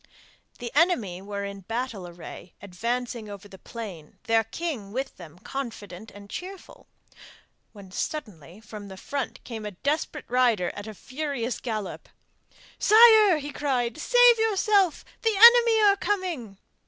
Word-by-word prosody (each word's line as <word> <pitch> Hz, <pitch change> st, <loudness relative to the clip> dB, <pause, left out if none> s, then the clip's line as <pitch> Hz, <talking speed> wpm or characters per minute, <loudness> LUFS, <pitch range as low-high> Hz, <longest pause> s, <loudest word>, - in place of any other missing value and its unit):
The 240 Hz, -1 st, -6 dB
enemy 245 Hz, -, +1 dB
were 200 Hz, 0 st, -5 dB
in 200 Hz, 0 st, -7 dB
battle 225 Hz, -1 st, -5 dB
array, 175 Hz, +1 st, -11 dB
advancing 235 Hz, +3 st, -4 dB
over 200 Hz, 0 st, -10 dB
the 190 Hz, -2 st, -14 dB
plain, 195 Hz, -11 st, -9 dB
their 225 Hz, 0 st, +2 dB
king 230 Hz, -4 st, -5 dB
with 265 Hz, +5 st, -4 dB
them 170 Hz, -2 st, -12 dB
confident 220 Hz, -4 st, -7 dB
and 200 Hz, 0 st, -13 dB
cheerful, 370 Hz, -, -9 dB, 0.8 s
when 200 Hz, -3 st, -14 dB
suddenly 185 Hz, -, -6 dB
from 210 Hz, -2 st, -10 dB
the 190 Hz, -1 st, -10 dB
front 280 Hz, +7 st, -5 dB
came 225 Hz, -3 st, -7 dB
a 210 Hz, -, -4 dB, 0.2 s
desperate 300 Hz, +1 st, -1 dB
rider 235 Hz, -7 st, +2 dB
at 205 Hz, +1 st, -8 dB
a 215 Hz, -, -8 dB
furious 260 Hz, -1 st, -4 dB
gallop. 215 Hz, -5 st, -5 dB, 0.7 s
'Sire!' 435 Hz, -4 st, +7 dB
he 290 Hz, 0 st, -6 dB
cried, 250 Hz, -5 st, -1 dB
'save -, -, +5 dB
yourself! 405 Hz, -5 st, +2 dB, 0.2 s
the 450 Hz, -2 st, +1 dB
enemy 465 Hz, 0 st, +7 dB
are 400 Hz, -1 st, +5 dB
coming! 350 Hz, -, -3 dB
235 Hz, 140 wpm, -26 LUFS, 200-335 Hz, 0.8 s, Sire